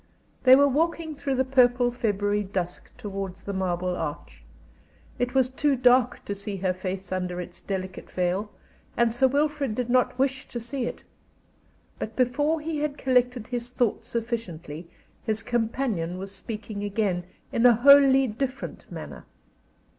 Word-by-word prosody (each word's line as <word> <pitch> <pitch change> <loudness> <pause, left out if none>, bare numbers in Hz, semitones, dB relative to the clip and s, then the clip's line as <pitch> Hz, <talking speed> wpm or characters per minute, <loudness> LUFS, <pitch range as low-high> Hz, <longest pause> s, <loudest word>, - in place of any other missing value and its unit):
They 255 0 +10
were 285 +1 +6
walking 320 +3 0
through 280 -1 -2
the 260 +1 +2
purple 245 -2 +4
February 205 -3 0
dusk 185 -3 -4
towards 195 -2 -6
the 200 - -4
Marble 180 -1 -1
Arch. - - -6 0.8
It 245 +1 -1
was 260 -2 +4
too 275 +2 +1
dark 250 -1 +3
to 205 - -2
see 200 0 -5
her 185 -1 0
face 185 +1 -5
under 180 -1 -2
its 175 0 -7
delicate 190 -1 -5
veil, 185 +3 -1 0.5
and 235 -1 +3
Sir 265 +3 +4
Wilfrid 285 -3 0
did 245 0 -2
not 250 0 +2
wish 265 0 0
to 240 - -5
see 240 +1 -3
it. - - -7 1.0
But 215 - -5
before 290 +5 +1
he 310 -1 -3
had 295 -1 -2
collected 250 -3 +1
his 240 0 -4
thoughts 240 -2 -1
sufficiently 185 -10 -4 0.3
his 220 0 -1
companion 225 -7 -1
was 195 +1 -6
speaking 210 +1 -6
again, 200 -3 0 0.3
in 235 +2 +5
a 240 - +7
wholly 270 +2 +7
different 260 +3 -5
manner. - - -8
235 Hz, 155 wpm, -26 LUFS, 195-260 Hz, 1.0 s, They